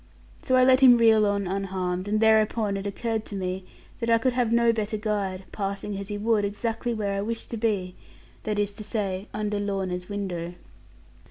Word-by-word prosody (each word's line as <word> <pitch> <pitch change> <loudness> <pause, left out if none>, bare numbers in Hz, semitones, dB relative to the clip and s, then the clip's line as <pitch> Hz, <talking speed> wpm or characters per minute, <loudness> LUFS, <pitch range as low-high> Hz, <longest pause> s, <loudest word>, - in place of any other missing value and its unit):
So 255 - +1
I 255 - +6
let 260 0 +6
him 255 -3 +8
reel 220 -2 +5
on 200 -1 0
unharmed; 185 -1 -2
and 215 +1 +1
thereupon 220 -1 +3
it 195 +1 -3
occurred 220 +2 -2
to 205 - -7
me 185 0 -3 0.3
that 230 -2 -2
I 230 - +6
could 250 +2 0
have 245 -2 +1
no 235 0 +4
better 215 -1 -2
guide, 200 -3 -2
passing 200 0 -3
as 200 0 -6
he 205 0 -4
would 215 0 +1
exactly 225 +4 -2
where 210 -3 -2
I 195 - -1
wished 225 +2 -4
to 230 - -3
be; 205 -5 -1 0.5
that 210 -1 -2
is 205 0 0
to 215 - -8
say 200 -2 -3
under 210 -1 -2
Lorna's 190 -3 -3
window. 180 -4 -4
205 Hz, 195 wpm, -26 LUFS, 195-225 Hz, 0.5 s, him